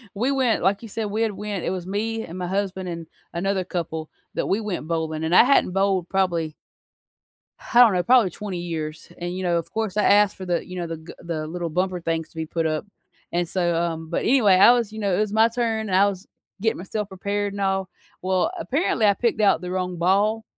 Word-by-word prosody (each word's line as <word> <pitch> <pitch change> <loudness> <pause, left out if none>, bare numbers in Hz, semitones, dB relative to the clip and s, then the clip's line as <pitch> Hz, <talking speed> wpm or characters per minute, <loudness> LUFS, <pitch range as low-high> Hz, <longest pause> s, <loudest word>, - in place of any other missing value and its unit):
we 245 +7 +1
went, 260 -9 +1
like 195 +3 +2
you 225 - -9
said, 220 +1 -3
we 220 +2 -1
had 225 -2 +1
went 205 -3 -4
it - - -1
was 185 -2 -4
me 220 +3 -2
and 170 - -9
my 180 -1 -3
husband, 190 -1 -2
and 165 -1 -5 0.3
another 190 +2 0
couple 160 -3 -4 0.2
that - - -2
we 200 - +1
went 195 -7 -4
bowling, 160 -1 -2
and 165 +3 +1
I - - +9
hadn't 265 -8 +3
bowled 195 -2 +1
probably 170 -5 0 1.0
I 240 - +1
don't 230 -5 +8
know 180 -1 +1
probably 240 -4 +5
20 190 0 -5
years 160 -3 -5
and, 175 +1 -4
you 185 - -4
know, 175 -1 +2
of 170 0 -4
course 220 -3 -2
I 210 - +3
asked 205 -1 +5
for 190 - -7
the, 175 -1 -1
you 185 - -8
know, 175 -2 -3
the 165 -1 -5
g 160 +1 -11
the 160 -2 -4
little 170 0 -4
bumper 180 +1 -1
things 165 -1 -2
to - - -24
be 160 0 -3
put 165 +1 -2
up, 155 +4 -1 0.5
and 175 0 0
so, 175 -2 0
um 165 -1 -2
but 170 - -1
anyway, 220 -7 +5
I 195 +6 +8
was, 230 -4 0
you 220 - -7
know, 200 -3 +1
it - - 0
was 215 -1 0
my 220 +1 +5
turn, 225 -2 -1
and 185 - 0
I 200 +2 +5
was 195 0 -5 0.3
getting 225 +1 +1
myself 205 +3 -4
prepared 200 +1 -2
and 200 - -5
all. 190 -1 0 0.3
Well, 185 - +1
apparently, 270 - +1
I 200 - +6
picked 235 +1 0
out 200 -5 +4
the 180 0 -5
wrong 180 -1 -2
ball 205 +5 +2
190 Hz, 240 wpm, -23 LUFS, 170-210 Hz, 1.0 s, I